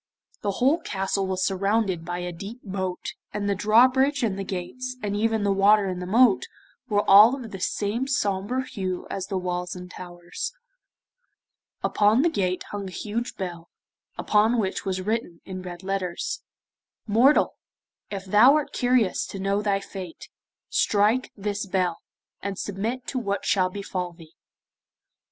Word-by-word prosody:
The 200 -1 -1
whole 270 - +3
castle 195 0 -2
was 185 -1 0
surrounded 195 -2 0
by 175 +1 -4
a 180 - -3
deep 200 +8 -8
moat, 190 -2 -4 0.2
and 205 0 -2
the 200 - +2
drawbridge 255 +7 +4
and 210 -4 +1
the 195 - -4
gates, 255 +8 -5
and 205 -1 -1
even 220 0 +1
the 200 - +2
water 200 +1 +5
in 180 -1 -3
the 180 - -5
moat, 230 +1 +4 0.4
were 205 -1 +1
all 210 +6 +8
of 240 -6 -8
the 195 - -7
same 210 +7 -1
sombre 245 0 0
hue 185 -7 -4
as 190 -1 -3
the 195 - -2
walls 180 -1 -3
and 180 0 -9
towers. 175 - -6 1.3
Upon 215 +5 +3
the 340 - +3
gate 185 - -1
hung 205 -1 -4
a - - -11
huge 225 +6 -4
bell, 175 -3 -6 0.5
upon 220 +3 +3
which 200 -2 -1
was 190 -1 -1
written 205 -4 -2
in 185 -1 -6
red 180 0 -8
letters: 190 -2 -2 0.6
'Mortal, 235 +7 +4 0.6
if 195 -1 -5
thou 215 +9 +6
art 305 -2 -1
curious 245 -6 +2
to - - -7
know 195 +1 0
thy 200 -2 +1
fate, 190 -3 -9 0.4
strike 215 +5 +2
this 205 0 -3
bell, 185 -3 0 0.4
and 200 -1 -4
submit 220 +7 -3
to 260 - -2
what 200 -4 -2
shall 185 -2 +2
befall 185 -2 -4
thee. 165 -1 -16
200 Hz, 160 wpm, -25 LUFS, 185-225 Hz, 1.3 s, all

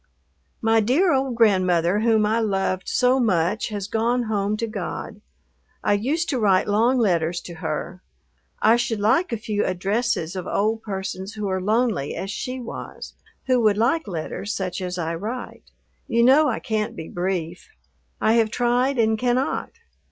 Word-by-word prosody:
My 225 0 +4
dear 280 - +3
old 265 -2 0
grandmother 185 -4 +3
whom 220 -1 +3
I 220 +2 +1
loved 195 -3 -1
so 250 +1 +3
much 200 -2 +1
has 205 -3 -4
gone 235 +3 0
home 210 -1 -1
to 230 - -1
God. 210 0 -6 0.6
I 205 - +3
used 280 +12 0
to 260 - 0
write 195 -4 +3
long 230 +5 +3
letters 175 -6 +1
to 175 - -9
her. 175 +4 -4 0.6
I 225 +2 +6
should 230 -2 -1
like 245 - +2
a 230 - -1
few 210 -1 -2
addresses 190 -1 -1
of 185 -1 -5
old 220 +2 0
persons 195 0 -5
who 210 -1 -3
are 190 0 -1
lonely 215 - 0
as 195 - -4
she 255 +4 -4
was, 240 - -8 0.3
who 255 -2 +2
would 210 -2 +3
like 255 +8 +1
letters 190 +3 -4
such 185 -1 -3
as 180 0 -4
I 165 -1 -2
write. 220 +9 -6 0.4
You 235 +1 +2
know 280 +5 +6
I 225 - -1
can't 215 -1 -2
be 160 - -7
brief. 175 - -3 0.5
I 220 - +3
have 225 -2 +3
tried 245 +3 +1
and 220 -1 +2
cannot. 250 +2 0
215 Hz, 165 wpm, -23 LUFS, 190-235 Hz, 0.6 s, I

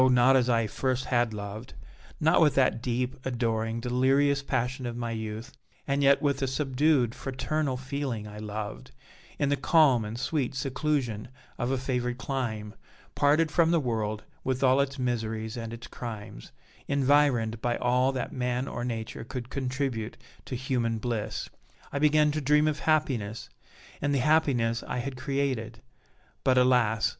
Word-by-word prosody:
not 125 +1 +5
as 125 -2 +3
I 115 -2 +3
first 130 +4 -1
had 120 -2 +1
loved 105 +2 -7 0.4
not 160 +3 +4
with 150 -3 +4
that 130 -3 +3
deep, 125 +1 -1
adoring, 115 -2 -1
delirious 135 +4 +2
passion 130 -1 -2
of 120 0 -5
my 120 -1 -3
youth, 110 0 -5 0.3
and 140 0 +1
yet 140 +1 +4
with 140 -1 +1
a 135 - +1
subdued, 135 -2 +2
fraternal 135 +1 -2
feeling 130 -5 -4
I 105 0 -9
loved; 105 +4 -5 0.5
in 145 -2 +1
the 145 - +3
calm 140 -4 +4
and 110 +3 -5
sweet 135 -2 -1
seclusion 135 -5 -1 0.3
of 120 - 0
a 135 - +1
favored 125 -1 -2
clime, 115 -6 -3 0.4
parted 150 +2 +3
from 165 +1 +4
the 170 -1 +3
world 110 -5 -2 0.2
with 130 0 -1
all 130 +1 +5
its 140 0 -2
miseries 110 -3 -2
and 115 -2 -5
its 115 +1 -8
crimes, 105 - -8 0.4
environed 135 -5 +2
by 120 -1 0
all 125 +2 +2
that 130 -3 -4
man 125 +1 -1
or 120 - -4
nature 115 -3 -4
could 125 +1 -7
contribute 130 -4 -2 0.3
to 130 - -4
human 120 -3 -1
bliss, 110 -1 -3 0.5
I 140 - 0
began 150 0 +4
to 155 +1 -2
dream 150 +2 +4
of 150 -1 0
happiness, 130 -9 0 0.5
in 145 0 +1
the - - +2
happiness 130 -5 +2
I - - -4
had 130 +2 -3
created. 130 -3 -2 0.6
But, 130 -1 +3
alas! 125 -4 +4
125 Hz, 160 wpm, -28 LUFS, 115-140 Hz, 0.6 s, not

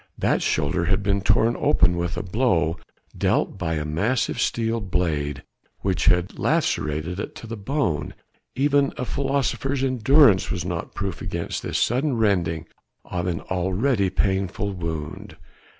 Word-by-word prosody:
That - - +1
shoulder 75 +4 0
had 95 +3 +1
been 100 0 +1
torn 115 +4 +3
open 90 - +3
with 85 +1 -2
a - - -2
blow 90 - +1 0.4
dealt - - 0
by 80 -2 -1
a 75 -1 -2
massive 100 +12 0
steel 115 0 0
blade 75 -7 -1 0.4
which 95 -2 0
had 90 0 +2
lacerated 80 +5 0
it - - -5
to - - -9
the 115 +1 -5
bone; 105 - -2 0.4
even 140 +1 +2
a 125 - -2
philosopher's 135 0 -1
endurance 130 -4 +4
was 90 -2 -2
not 85 -2 -4
proof 100 -3 -3
against 85 -2 -3
this - - -2
sudden 130 +2 +1
rending 85 -7 +1 0.4
of 90 0 -3
an 85 -2 -2
already 95 +4 0
painful 95 +1 -1
wound. 85 +2 -5
95 Hz, 145 wpm, -24 LUFS, 85-115 Hz, 0.4 s, endurance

